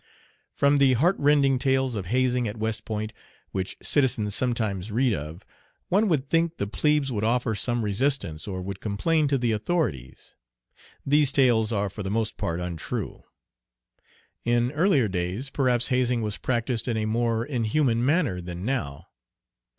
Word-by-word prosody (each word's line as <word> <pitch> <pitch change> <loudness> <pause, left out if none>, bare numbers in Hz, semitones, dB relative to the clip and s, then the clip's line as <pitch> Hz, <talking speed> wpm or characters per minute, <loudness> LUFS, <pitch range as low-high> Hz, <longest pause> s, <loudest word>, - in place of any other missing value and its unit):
From 140 0 +3
the 135 -2 +5
heartrending 140 -2 +3
tales 130 -1 +1
of 100 -5 -4
hazing 125 +1 +1
at 105 +2 -5
West 110 0 -2
Point, 110 0 -4 0.4
which 95 -1 -3
citizens 120 -7 +1
sometimes 110 -5 -1
read 120 +2 +2
of, 80 +3 -6 0.4
one 205 +4 +3
would 145 -7 0
think 165 +2 +1
the - - -1
plebes 150 +5 +1
would 105 -3 -2
offer 120 0 +1
some 120 +2 -1
resistance 105 - -1
or 95 -2 -4
would 95 0 -6
complain 150 +10 0
to 140 -1 +1
the 120 -2 0
authorities. 105 - -3 0.7
These 145 0 +4
tales 120 -5 +3
are 105 -2 0
for 100 +2 -7
the 95 - -3
most 110 +1 -1
part 85 +1 -3
untrue. 90 -2 -5 1.2
In 120 +1 +1
earlier 150 - +3
days 95 +8 -3
perhaps 125 -3 +1
hazing 125 -2 +1
was 105 -1 -3
practised 120 -1 -1
in 115 -2 0
a 110 - -1
more 115 +1 0
inhuman 120 -1 0
manner 135 - +1
than 90 +1 -7
now. 90 - -3
120 Hz, 155 wpm, -25 LUFS, 105-135 Hz, 1.2 s, the